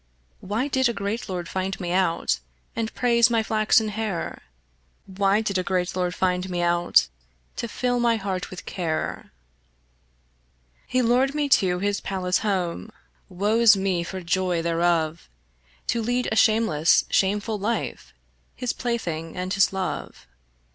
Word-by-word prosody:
Why 215 Hz, +8 st, -2 dB
did 260 Hz, -3 st, +2 dB
a -, -, -1 dB
great 200 Hz, +2 st, -4 dB
lord 180 Hz, -2 st, -4 dB
find 190 Hz, +2 st, -3 dB
me 175 Hz, -2 st, -3 dB
out, 170 Hz, -, +1 dB, 0.4 s
And 225 Hz, -1 st, -2 dB
praise 235 Hz, -1 st, +4 dB
my 230 Hz, -1 st, +2 dB
flaxen 215 Hz, 0 st, +2 dB
hair? 210 Hz, -4 st, -4 dB, 0.6 s
Why 195 Hz, +2 st, +1 dB
did 200 Hz, -4 st, -1 dB
a -, -, -1 dB
great 180 Hz, -1 st, -1 dB
lord 180 Hz, -1 st, -1 dB
find 180 Hz, 0 st, 0 dB
me 175 Hz, -1 st, -1 dB
out, 175 Hz, -, +3 dB, 0.5 s
To 235 Hz, -, -3 dB
fill 245 Hz, +2 st, -1 dB
my 235 Hz, -1 st, +3 dB
heart 195 Hz, -4 st, -3 dB
with 185 Hz, -, -9 dB
care? 165 Hz, -4 st, -3 dB, 1.6 s
He 255 Hz, 0 st, +1 dB
lured 255 Hz, +4 st, +2 dB
me 295 Hz, -1 st, +1 dB
to 185 Hz, -8 st, +3 dB
his 200 Hz, +2 st, -1 dB
palace 185 Hz, -1 st, -1 dB
home 190 Hz, -2 st, -2 dB, 0.4 s
Woe's 210 Hz, +3 st, +4 dB
me 190 Hz, -2 st, 0 dB
for 185 Hz, +2 st, -6 dB
joy 175 Hz, -1 st, 0 dB
thereof 165 Hz, -1 st, 0 dB, 0.6 s
To 235 Hz, -, +1 dB
lead 245 Hz, +2 st, 0 dB
a -, -, 0 dB
shameless 215 Hz, -9 st, +4 dB
shameful 205 Hz, +2 st, +1 dB
life, 225 Hz, +4 st, -3 dB, 0.4 s
His 250 Hz, -2 st, -2 dB
plaything 170 Hz, -10 st, -3 dB
and 185 Hz, +1 st, -2 dB
his 195 Hz, -2 st, +3 dB
love. 190 Hz, -, -4 dB
195 Hz, 145 wpm, -24 LUFS, 180-225 Hz, 1.6 s, praise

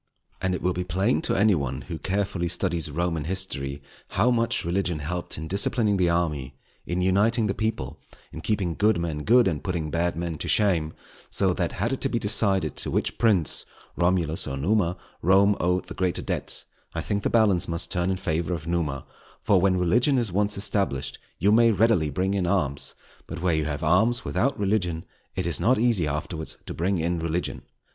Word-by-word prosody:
And 95 Hz, 0 st, 0 dB
it -, -, -6 dB
will 90 Hz, +1 st, +1 dB
be 90 Hz, -, -2 dB
plain 95 Hz, +7 st, 0 dB
to -, -, 0 dB
any 105 Hz, +2 st, +4 dB
one 70 Hz, -4 st, -2 dB
who 85 Hz, -3 st, -7 dB
carefully 95 Hz, -2 st, -1 dB
studies 85 Hz, -2 st, 0 dB
Roman 80 Hz, 0 st, -2 dB
History, 70 Hz, -7 st, -3 dB, 0.2 s
how 115 Hz, +6 st, +2 dB
much 115 Hz, -6 st, +1 dB
religion 90 Hz, -1 st, 0 dB
helped 85 Hz, +4 st, -3 dB
in 80 Hz, +1 st, -5 dB
disciplining 100 Hz, +3 st, +2 dB
the 90 Hz, -2 st, +2 dB
army, 75 Hz, -6 st, -1 dB, 0.3 s
in 90 Hz, +1 st, -1 dB
uniting 105 Hz, +5 st, +3 dB
the 100 Hz, -, 0 dB
people, 100 Hz, -12 st, -3 dB, 0.3 s
in 80 Hz, -, -8 dB
keeping 95 Hz, -1 st, -1 dB
good 105 Hz, +1 st, +2 dB
men 80 Hz, -3 st, -3 dB
good, 120 Hz, +3 st, +5 dB
and 75 Hz, -6 st, -2 dB
putting 85 Hz, -5 st, -3 dB
bad 85 Hz, +1 st, 0 dB
men 85 Hz, -2 st, -4 dB
to -, -, -4 dB
shame; 85 Hz, -7 st, +2 dB, 0.4 s
so -, -, +2 dB
that -, -, -2 dB
had -, -, -1 dB
it -, -, -4 dB
to -, -, +1 dB
be -, -, -1 dB
decided 95 Hz, -1 st, +2 dB
to -, -, -3 dB
which -, -, -1 dB
prince, 100 Hz, -9 st, +2 dB, 0.3 s
Romulus 85 Hz, -2 st, 0 dB
or 70 Hz, -, -3 dB
Numa, 90 Hz, +3 st, +1 dB, 0.2 s
Rome 100 Hz, +3 st, +4 dB
owed 90 Hz, +1 st, 0 dB
the 95 Hz, -, -8 dB
greater 90 Hz, -2 st, -1 dB
debt, -, -, -1 dB, 0.3 s
I -, -, -1 dB
think 100 Hz, 0 st, -2 dB
the -, -, 0 dB
balance 105 Hz, -6 st, +3 dB
must 85 Hz, 0 st, +1 dB
turn 90 Hz, 0 st, 0 dB
in 95 Hz, -, 0 dB
favour 85 Hz, -2 st, -1 dB
of 80 Hz, -2 st, -8 dB
Numa; 80 Hz, -6 st, -2 dB, 0.4 s
for 95 Hz, -3 st, +3 dB
when 95 Hz, -1 st, +3 dB
religion 120 Hz, -, +2 dB
is 115 Hz, -6 st, 0 dB
once 105 Hz, +2 st, +1 dB
established 100 Hz, -9 st, -1 dB, 0.2 s
you 100 Hz, -, +2 dB
may 115 Hz, +2 st, +5 dB
readily 105 Hz, -7 st, +3 dB
bring 95 Hz, +7 st, -1 dB
in 95 Hz, -3 st, 0 dB
arms; 75 Hz, -8 st, 0 dB, 0.3 s
but -, -, -6 dB
where 90 Hz, -2 st, +2 dB
you 80 Hz, -1 st, 0 dB
have 75 Hz, 0 st, -3 dB
arms 110 Hz, +10 st, +2 dB
without 135 Hz, -1 st, 0 dB
religion 95 Hz, -5 st, 0 dB, 0.3 s
it 90 Hz, -, -2 dB
is 85 Hz, -5 st, -1 dB
not 115 Hz, +9 st, +3 dB
easy 110 Hz, -8 st, +2 dB
afterwards 80 Hz, +2 st, -4 dB
to -, -, -5 dB
bring 95 Hz, +3 st, 0 dB
in 85 Hz, +1 st, -1 dB
religion. 85 Hz, +2 st, -2 dB
90 Hz, 200 wpm, -25 LUFS, 80-100 Hz, 0.4 s, good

